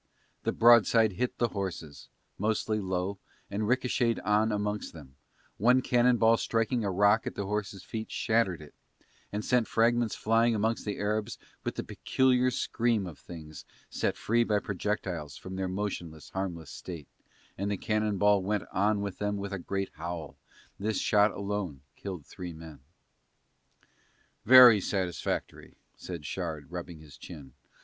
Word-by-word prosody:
The - - +2
broadside 115 -1 +5
hit 120 +7 -2
the 120 - +1
horses, 90 -8 -6 0.3
mostly 110 +1 0
low, 95 0 -2 0.3
and 105 +1 -1
ricochetted 125 -1 +1
on 105 +2 +3
amongst 105 0 -2
them; 70 -5 -13 0.4
one 125 +5 +4
cannon 125 0 +3
ball 115 0 +5
striking 115 +1 0
a 100 - 0
rock 100 +3 +3
at - - -4
the 100 - -3
horses' 100 -2 -3
feet 110 -1 -5
shattered 110 -8 0
it 75 - -15 0.6
and 105 +1 -3
sent 125 -3 +2
fragments 115 0 +2
flying 115 +1 +2
amongst 110 +2 0
the 105 - -3
Arabs 105 +1 -2 0.3
with - - -3
the - - -3
peculiar 130 -1 +2
scream 115 -4 0
of 85 -5 -9
things 80 -3 -10 0.3
set - - -1
free 120 +2 +2
by 105 -2 +1
projectiles 95 -7 -3
from 95 +1 -8
their 95 0 -2
motionless 90 -5 -5
harmless 90 -5 -4
state, 85 -6 -8 0.5
and 100 +1 -2
the 100 - -1
cannon 105 -1 0
ball 105 0 +4
went 105 +1 -1
on 105 +1 +1
with 100 -2 -5
them 105 0 -1
with 100 0 -5
a 100 - -3
great 95 +2 -3
howl, 85 -2 -5 0.4
this 105 0 -1
shot 105 -1 +4
alone 100 -8 -4
killed 90 -7 -7
three 90 -2 -8
men. 80 -2 -11 1.7
"Very 125 -3 +9
satisfactory," 90 -3 -3 0.2
said 85 -5 -7
Shard 80 -5 -5
rubbing 85 -2 -7
his 75 -3 -14
chin. 70 -7 -11
100 Hz, 155 wpm, -29 LUFS, 90-110 Hz, 1.7 s, Very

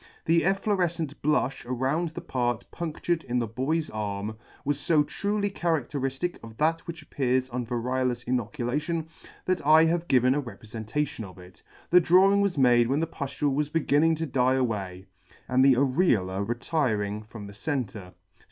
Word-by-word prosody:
The 165 +1 +4
efflorefcent 180 -5 0
blufh 140 -3 0
around 135 +7 0
the 155 - -8
part 120 -2 -2
punctured 170 0 -2
in 125 0 -2
the 120 - +1
boy's 135 +8 -1
arm 105 0 -4 0.3
was 145 0 -1
fo 155 -3 +4
truly 205 +6 -2
charadteriftic 150 -2 -2
of 115 -1 -11
that 165 +3 0
which 165 -1 -7
appears 130 -1 0
on 125 -1 -4
variolous 125 0 -1
inoculation, 135 +7 -2 0.4
that 185 - 0
I 155 +2 +6
have 170 +1 0
given 130 0 +4
a 145 - 0
reprefentation 115 +3 -4
of 95 -3 -11
it. 90 0 -15 0.3
The 180 - +8
drawing 190 +4 +5
was 200 -5 0
made 120 -3 +5
when 135 +4 +1
the 165 - +1
puftule 140 -2 -2
was 150 +1 0
beginning 160 +1 +2
to 160 +1 -3
die 130 -2 +2
away, 100 -7 -2 0.4
and 130 +1 +3
the 135 -1 +6
areola 120 - +1
retiring 115 -5 -1
from 110 -1 -10
the 100 - -10
centre. 105 - -4
135 Hz, 160 wpm, -27 LUFS, 120-160 Hz, 0.4 s, The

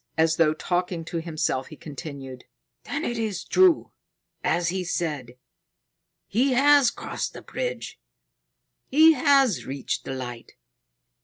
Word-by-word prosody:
As 160 0 +3
though 155 -2 +3
talking 175 0 -2
to 170 0 -3
himself, 155 -5 -2
he 155 - -11
continued: 140 -4 -9 0.4
"Then 295 +2 -3
it 240 -1 -2
is 215 -5 -2
true, 370 -3 +3 0.5
as 170 +1 +1
he 185 +1 -2
said. 150 -8 -3 0.9
He 255 +6 +1
has 280 0 +6
crossed - - -5
the - - -10
bridge. - - -5 0.9
He 315 +4 +6
has 275 - +3
reached 135 0 -3
the 135 - -5
Light. 120 -2 -7
175 Hz, 130 wpm, -25 LUFS, -, 0.9 s, has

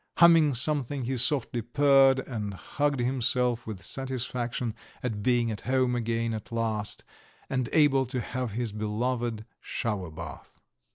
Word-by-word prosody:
Humming 165 -5 +6
something 140 0 +3
he 130 +2 -2
softly 125 -1 +1
purred 135 +2 +4
and 105 -7 -5
hugged 145 +7 -1
himself 125 -1 +1
with 105 -4 -6
satisfaction 125 -3 -3 0.3
at 110 -5 -2
being 120 0 +2
at 105 - -6
home 130 -1 +1
again 115 -1 -1
at 110 0 -7
last, 110 -2 -1 0.5
and 130 -3 -1
able 140 -4 +4
to 130 +1 -3
have 125 -1 -4
his 120 0 -2
beloved 110 +2 -2
shower 100 -6 -3
bath. 80 - -10
120 Hz, 135 wpm, -28 LUFS, 115-130 Hz, 0.5 s, Humming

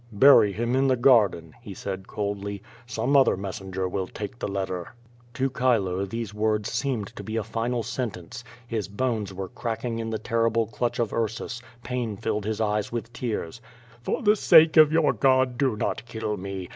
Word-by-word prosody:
"J5ury 115 -4 +7
him 120 +3 0
in 135 +1 +3
the 130 - +3
garden," 105 - +3
he 105 -5 -9
said 95 0 -6
coldly, 100 -1 -4 0.2
"some 125 +4 0
other 135 -8 +5
mes 95 +2 -5
senger 95 -1 -3
will 95 0 -3
take 105 +4 -7
the - - -2
letter." 95 -1 -4 0.4
To 135 0 +1
Chilo 110 -8 +1
these 115 +1 -5
wonls 105 0 0
seemed 115 -4 -2
to 110 - -7
])e - - -3
a 115 - 0
final 115 +2 -2
sentence. 115 -4 -5 0.2
His 115 -4 -3
Imnes 110 -2 -2
were 95 0 -6
cracking 115 +1 -4
in 115 0 -3
the 110 - -2
terrible 115 0 +1
clutch 115 +3 -2
of 115 -3 -1
Ursus, 115 +1 -3 0.2
pain 120 -5 -3
filled 105 +1 -2
his 110 0 -2
eyes 105 -1 0
with 115 0 -5
tears. 115 -4 -4 0.4
"For - - -2
the 210 0 +5
sake 160 -5 +6
of 155 -2 +8
vour 160 -1 +3
God, 130 -2 +3
do 130 -5 +2
not 105 - -2
kill 110 -2 -3
me! 95 -1 -6
110 Hz, 185 wpm, -26 LUFS, 100-125 Hz, 0.4 s, of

